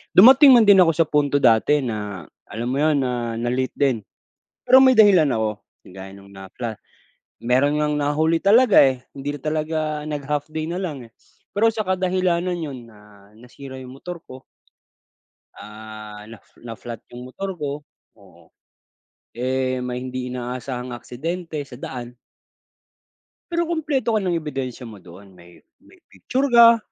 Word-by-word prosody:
Dumating 265 +8 +8
man 235 -2 +6
din 195 -2 +7
ako 165 - +3
sa 165 - +4
punto 145 -1 +2
dati 125 +5 +4
na, 105 -6 -5 0.2
alam 115 +4 -5
mo - - -1
'yon, 155 -1 +2
na, 120 -3 -3
na-late 125 +2 -2
din. 135 -5 +1 0.7
Pero 260 +1 +7
may 260 -1 +6
dahilan 190 -8 +6
ako, 110 -3 -2 0.3
kagaya 95 +1 -11
ng 100 0 -16
na-fla 95 +5 -7 0.7
meron 130 +5 +2
ngang 150 0 0
nahuli 155 +3 +1
talaga 220 +3 +5
eh, 130 -2 0
hindi 140 +1 -4
na - - -10
talaga 155 +1 -2 0.3
nag-half 145 0 -3
day 155 0 -4
na 175 - -4
lang 150 -9 -5
eh, - - -29 0.4
pero 225 +3 +4
sa 220 -1 -3
kadahilanan 185 -1 0
'yon 135 -8 -7
na, 105 -2 -19
nasira 130 +3 -11
yung 130 0 -10
motor 175 +2 -7
ko. 130 0 -12 1.2
Ah, 105 0 -11
naf 115 -2 -14 0.2
na-flat 115 -1 -9
yung 125 +1 -10
motor 190 +4 -6
ko, 145 -1 -4 0.4
oo. 90 -4 -20 0.9
Eh, 130 +1 -1
may 125 0 -4
hindi 130 0 -5
inaasahang 125 0 -5
aksidente 160 +7 -6
sa 125 - -11
daan. 125 -2 -7 1.4
Pero 340 0 0
kumpleto 295 -8 -1
ka 215 - +1
ng 180 -3 -1
ebidensya 135 -5 -5
mo 105 -5 -11
doon, 95 +3 -15
may 85 -1 -18 0.2
may 335 +5 -21
picture 265 +2 -3
ka, 235 0 +8
135 Hz, 150 wpm, -22 LUFS, 120-170 Hz, 1.4 s, Dumating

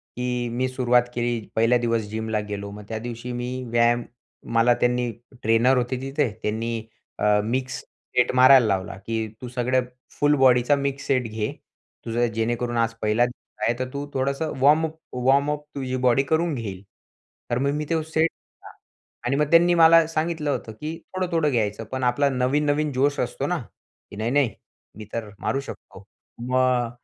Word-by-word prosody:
की 125 -1 -2
मी 130 +2 0
सुरुवात 125 -1 +3
केली. 120 -2 -2
पहिल्या 115 +2 +4
दिवस 115 -1 +1
जिमला 110 0 -2
गेलो. 100 0 -4
मग 105 0 -9
त्या 110 - -3
दिवशी 120 +1 -6
मी 125 +1 -4
व्यायाम 120 0 +3 0.5
मला 115 +1 +5
त्यांनी 125 -1 +1 0.3
ट्रेनर 115 +4 +4
होते 125 +1 -1
तिथे, 135 -1 0
त्यांनी 115 +1 -2 0.3
अ, 105 0 +3
मिक्स 130 +3 -2 0.4
सेट 125 - +3
मारायला 130 -1 +7
लावला 95 0 -1
की 110 -1 -2
"तू 125 - -6
सगळं 125 +1 +1 0.3
फुल 145 0 +2
बॉडीचा 130 +1 +5
मिक्स 140 -1 -3
सेट 130 -2 +2
घे. 110 -1 -3 0.5
तुझं 120 +1 +1
जेणेकरून 120 +1 -1
आज 115 0 +1
पहिला 110 +3 +3
दिवस 120 -3 -10
आहे, 115 - +2
तर 130 - -1
तू 140 +1 -4
थोडंसं 140 +4 -1
वॉर्मअप 155 +3 +4 0.3
वॉर्मअप 145 +2 +2
तुझी 130 -2 -3
बॉडी 125 +3 +4
करून 165 +1 +2
घेईल." 100 -6 -5 0.7
तर 120 - +2
मग 140 +1 +1
मी 150 0 -2
ते 165 -1 +1
सेट 160 0 0
घेतला - - -18 0.5
आणि 125 +3 +1
मग 150 0 +1
त्यांनी 175 +1 +6
मला 165 0 +7
सांगितलं 160 -2 -2
होतं 110 - -4
की 155 +2 -4 0.2
थोडं-थोडं 170 -5 0
घ्यायचं, 110 -2 -1
पण 130 0 -3
आपला 130 +3 +2
नवीन-नवीन 145 +3 +1
जोश 140 +3 +1
असतो - - -2
ना 175 -2 -1 0.5
की - - -10
"नाही 110 +3 -2
नाही, 140 -3 +3 0.5
मी 110 - -8
तर 115 -2 -4
मारू 135 - -1
शकतो." 140 - -10 0.4
मग 125 -1 +1
125 Hz, 170 wpm, -24 LUFS, 115-140 Hz, 0.7 s, मारायला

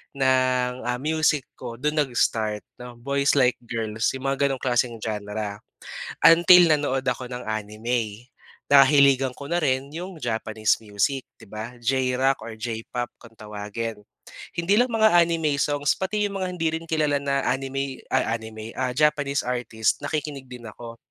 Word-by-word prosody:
ng, 130 -2 +2
ah, 125 0 -1
music 155 -1 +1
ko. 120 -2 -6
Dun 150 +1 0
nag 140 -4 0
start 105 -2 +1 0.2
'no, 125 -1 -9
Boys 140 +1 +1
Like 125 -2 +3
Girls, 110 0 -2
yung 135 +1 -3
mga 140 +1 +1
ganong 135 -2 -3
klaseng 120 -3 0
genre. 105 -1 -4 0.7
Until 175 +2 +8
nanood 145 -3 0
ako 125 0 -4
ng 125 0 -6
anime. 110 +2 -3 0.4
Nahiligan 135 -2 +5
ko 140 - -8
na 175 - +2
rin 135 0 0
yung 180 +1 -6
Japanese 110 -3 0
music 110 +6 -1
di 110 - -14
ba, 110 +4 -7
J-rock 130 +2 +1
or 110 -1 -8
J-pop 120 +2 -4
kung 115 -1 -15
tawagin. 105 +1 -6 0.6
Hindi 175 +4 +2
lang 250 - +3
mga 220 -2 +4
anime 165 -4 +2
songs, 145 -1 +1
pati 210 +2 -1
yung 200 -1 -5
mga 185 - -1
hindi 165 -2 0
rin 165 - -13
kilala 150 -3 +1
na 140 -1 0
anime, 135 0 -2
ay - - +3
anime 110 0 -9
ah, 130 -1 0
Japanese 145 -2 +2
artist, 115 -3 -1
nakikinig 145 -2 -4
din 125 -2 -10
ako. 115 +2 -10
130 Hz, 160 wpm, -24 LUFS, 115-145 Hz, 0.7 s, Until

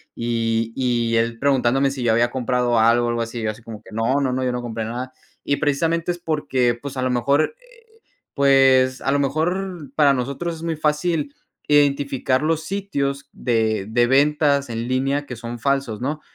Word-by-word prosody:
y 115 -1 -1
y 120 -3 0
él 115 0 0
preguntándome 135 0 +2
si 135 -2 -6
yo 120 -2 +2
había 120 +1 +2
comprado 125 -2 0
algo, 120 +2 +3
algo 120 0 -1
así, 115 0 -4
yo 110 - 0
así 110 - -14
como 110 -2 -10
que: - - -15
"No, 115 +6 +1
no, 130 -2 0
no, 130 +1 -1
yo 125 - 0
no 125 0 -4
compré 115 -2 -4
nada". 125 +3 -5 0.3
Y 140 - 0
precisamente 165 +4 0
es 175 - -5
porque, 145 -7 0
pues, 135 +3 -8
a 130 - -1
lo 130 - 0
mejor, 140 - +1
eh, - - -21 0.6
pues, 135 -2 +4
a 135 - 0
lo 140 - +2
mejor 160 +3 -2
para 145 -2 +5
nosotros 140 +7 -3
es - - -12
muy 165 -1 -2
fácil 150 -1 -1 0.3
identificar 140 -2 +2
los 160 0 0
sitios 150 -8 -3
de 110 -4 0
de 120 +2 +3
ventas 140 +1 +2
en 115 0 -4
línea 135 +3 0
que 125 - -7
son 120 +1 -7
falsos, 135 -3 -1
¿no? 150 +4 -3
130 Hz, 190 wpm, -21 LUFS, 120-145 Hz, 0.6 s, para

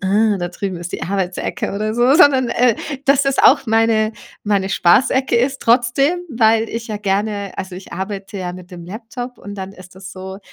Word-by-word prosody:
da 200 -2 +1
drüben 185 0 -5
ist 175 +1 -7
die - - -5
Arbeitsecke 195 +4 -3
oder 215 +2 -2
so, 250 +3 +4
sondern, 270 -7 +5
äh, 245 -2 +2 0.3
dass 275 0 +4
es 275 - 0
auch 275 -1 +5
meine 225 0 +2 0.3
meine 200 -2 0
Spaßecke 250 +10 +3
ist 265 +3 +1
trotzdem, 255 +8 +2
weil 225 -2 +2
ich 230 0 -5
ja 210 - -3
gerne 200 0 -2
also, 190 -2 -5
ich 190 - -11
arbeite 195 +2 -5
ja 180 -1 -4
mit 180 0 -12
dem 175 -2 -10
Laptop 240 +5 -7
und 205 0 -9
dann 190 0 -6
ist 185 -2 -15
das 190 -1 -10
so, 190 +1 -8
210 Hz, 190 wpm, -18 LUFS, 190-240 Hz, 0.3 s, sondern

